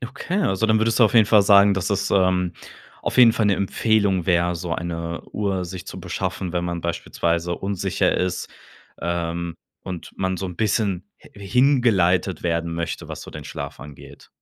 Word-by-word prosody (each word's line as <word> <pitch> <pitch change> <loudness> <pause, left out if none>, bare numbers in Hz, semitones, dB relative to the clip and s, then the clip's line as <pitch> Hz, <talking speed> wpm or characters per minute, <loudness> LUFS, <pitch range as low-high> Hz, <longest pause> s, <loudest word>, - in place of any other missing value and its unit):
Okay, 140 - -3
also 95 - +1
dann 110 0 +3
würdest 115 +2 +1
du 120 - +7
auf 110 - +1
jeden 110 -3 +6
Fall 105 -1 +5
sagen, 100 0 +6
dass 95 - -2
das, 100 -2 -1
ähm, 90 -2 +2 0.5
auf - - -2
jeden 120 -2 +8
Fall 110 -2 +1
'ne 100 - +3
Empfehlung 100 -2 +1
wäre, 90 -1 +2
so 85 0 -5
eine 85 0 -4
Uhr 100 -3 -1
sich 90 0 -8
zu - - -8
beschaffen, 90 -3 -4
wenn 90 -1 -1
man 85 -1 -3
beispielsweise 85 0 -1
unsicher 95 0 -1
ist, 90 -1 -2 0.5
ähm, 85 0 -3 0.3
und 90 -3 -7
man 95 -1 -1
so 95 - -4
'n 90 - -8
bisschen 100 -3 0 0.2
hi - - -17 0.2
hingeleitet 105 -8 +2
werden 85 -1 -1
möchte, 85 0 -4
was - - -7
so - - -10
den 75 - -9
Schlaf - - -7
angeht. 75 0 -13
95 Hz, 185 wpm, -22 LUFS, 85-105 Hz, 0.5 s, jeden